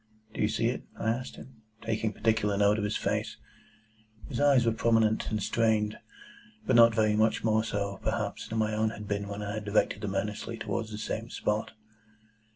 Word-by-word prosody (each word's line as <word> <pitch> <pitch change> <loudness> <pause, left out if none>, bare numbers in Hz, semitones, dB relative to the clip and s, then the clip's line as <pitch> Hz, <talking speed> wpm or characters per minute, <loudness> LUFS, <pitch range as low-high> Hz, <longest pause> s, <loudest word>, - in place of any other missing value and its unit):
"Do - - -4
you 105 - +3
see 110 +1 -1
it?" 125 - -3 0.2
I 110 - -1
asked 125 +2 -4
him, 120 -4 -14 0.2
taking 110 -1 -1
particular 105 -1 +1
note 105 +1 +3
of - - -2
his 105 0 -1
face. - - -2 0.9
His - - -3
eyes 140 -4 +5
were 115 - +3
prominent 115 -1 +2
and 110 -2 -2
strained, 110 -2 +1 0.7
but 130 - +2
not 115 -1 +7
very 110 -1 +3
much 110 +1 +2
more 110 0 +2
so, 100 -2 -3
perhaps, 110 -2 -2
than 115 - -4
my 110 -1 +1
own 110 +1 +1
had 105 -1 -8
been 100 0 -2
when 100 +1 -5
I 100 0 -4
had 110 -1 -4
directed 105 0 +1
them 100 -2 -3
earnestly 105 +3 -3
towards 110 +1 -3
the 105 - -6
same 110 +1 -4
spot. 105 0 -2
110 Hz, 195 wpm, -29 LUFS, 105-115 Hz, 0.9 s, not